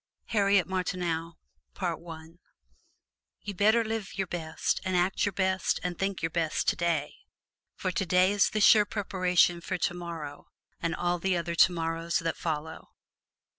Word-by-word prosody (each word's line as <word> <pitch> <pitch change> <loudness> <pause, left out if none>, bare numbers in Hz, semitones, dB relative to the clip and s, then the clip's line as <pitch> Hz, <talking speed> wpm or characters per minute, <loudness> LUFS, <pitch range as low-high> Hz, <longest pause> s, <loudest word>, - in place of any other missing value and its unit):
HARRIET 200 -4 +3
MARTINEAU 175 -3 -2 2.1
You 205 - -5
better 215 +4 +3
live 220 -3 -4
your 195 - 0
best 165 -3 -2
and 185 -2 0
act 185 +3 +1
your - - 0
best 190 -1 0
and 180 -1 -2
think 195 -3 -2
your 165 - 0
best 165 -2 -1
today; 165 -4 0 0.6
for 185 - -2
today 185 0 +2
is 205 -1 +3
the 215 - -1
sure 210 0 +7
preparation 185 -4 +1
for - - -3
tomorrow 170 -4 -4 0.3
and 170 -1 -1
all 175 0 -1
the 185 0 +1
other 170 0 -3
tomorrows 165 -1 +2
that 165 -1 -2
follow. 160 -1 -5
180 Hz, 135 wpm, -28 LUFS, 170-195 Hz, 2.1 s, sure